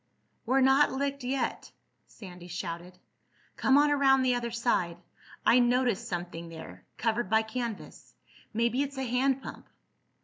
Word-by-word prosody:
"We're 265 +2 +3
not 265 +2 +5
licked 280 0 -2
yet," 260 +2 -2 0.4
Sandy 180 -4 -12
shouted. 175 0 -6 0.6
"Come 270 +1 +3
on 295 0 +4
around 270 -2 +4
the 255 -1 +3
other 240 -1 -2
side. 225 -8 0 0.5
I 245 - +6
noticed 245 -3 +1
something 175 -1 -5
there—covered 165 - -4
by 220 +1 +3
canvas. 230 -1 -6 0.4
Maybe 235 +3 +1
it's 280 -1 -3
a 265 - -2
hand 260 +2 +1
pump." - - -9
240 Hz, 135 wpm, -29 LUFS, 185-265 Hz, 0.6 s, I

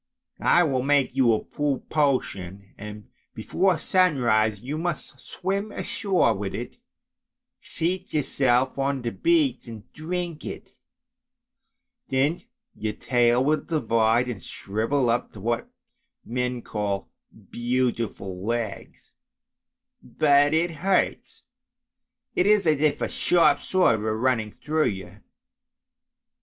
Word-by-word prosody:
I 175 - +6
will 135 -6 0
make 140 -1 +2
you 130 -3 +4
a 110 - +1
potion, 130 - -1
and 105 0 -10 0.2
before 185 -2 +1
sunrise 120 - +2
you 140 +7 -5
must 165 -5 -4
swim 200 - -3
ashore 190 - +1
with 100 -1 -4
it, - - -6 0.8
seat 180 +3 -3
yourself 130 -3 +1
on 135 -1 -1
the 120 - -2
beach 325 - +1
and 110 -3 -9
drink 170 0 -4
it; - - -8 1.4
then 140 +6 +1 0.3
your 110 0 -3
tail 120 +1 +2
will 155 +1 +2
divide 115 -5 +1
and 120 -6 -5
shrivel 115 +6 -1
up 120 +1 -2
to 105 - -11
what 115 +3 -2 0.6
men 125 0 -2
call 100 -2 -3 0.4
beautiful 120 -6 -2
legs, 115 -1 -4 0.9
but 145 -1 +3
it 170 +2 +1
hurts, 190 +3 0 0.9
it 180 - +2
is 210 -2 +4
as 155 -3 +2
if 155 -1 +2
a - - +1
sharp 175 -1 +3
sword 180 - +2
were 110 0 -1
running 115 -3 0
through 155 +6 -1
you. 95 0 -6
130 Hz, 115 wpm, -25 LUFS, 110-155 Hz, 1.4 s, I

